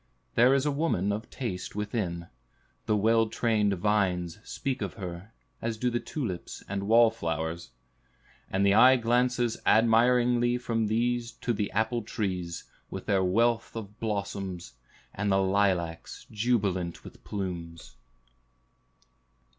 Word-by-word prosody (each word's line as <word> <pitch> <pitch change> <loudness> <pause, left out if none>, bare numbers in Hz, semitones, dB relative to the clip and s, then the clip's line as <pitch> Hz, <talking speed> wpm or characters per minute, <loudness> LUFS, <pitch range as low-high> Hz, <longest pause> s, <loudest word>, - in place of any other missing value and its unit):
There 125 +3 +5
is 135 +1 +1
a 150 - +2
woman 140 - 0
of 105 +4 -4
taste 100 -9 -5
within; 105 -5 -3 0.6
the 105 - +2
well 115 +2 +3
trained 110 -3 +1
vines 95 -2 0
speak 135 0 -4
of - - -4
her, 90 0 -7 0.3
as 115 -1 -2
do 125 +2 0
the 120 - 0
tulips 115 - -5
and 100 0 -3
wall 115 +1 +6
flowers. 80 - -3 0.8
And 95 +1 +1
the 100 - +5
eye 130 +5 +7
glances 120 0 +1
admiringly 120 +2 +4
from 115 -3 -1
these 120 +2 0
to 120 - 0
the 105 -2 -2
apple 110 +3 0
trees, 95 -6 -3 0.3
with - - -7
their 95 -1 +2
wealth 115 +6 +1
of 105 -2 -8
blossoms, 100 - -4 0.4
and 100 0 -1
the 95 - +4
lilacs, 95 -4 0
jubilant 100 -6 0
with - - -13
plumes. 85 -7 -6
105 Hz, 130 wpm, -28 LUFS, 95-120 Hz, 0.8 s, eye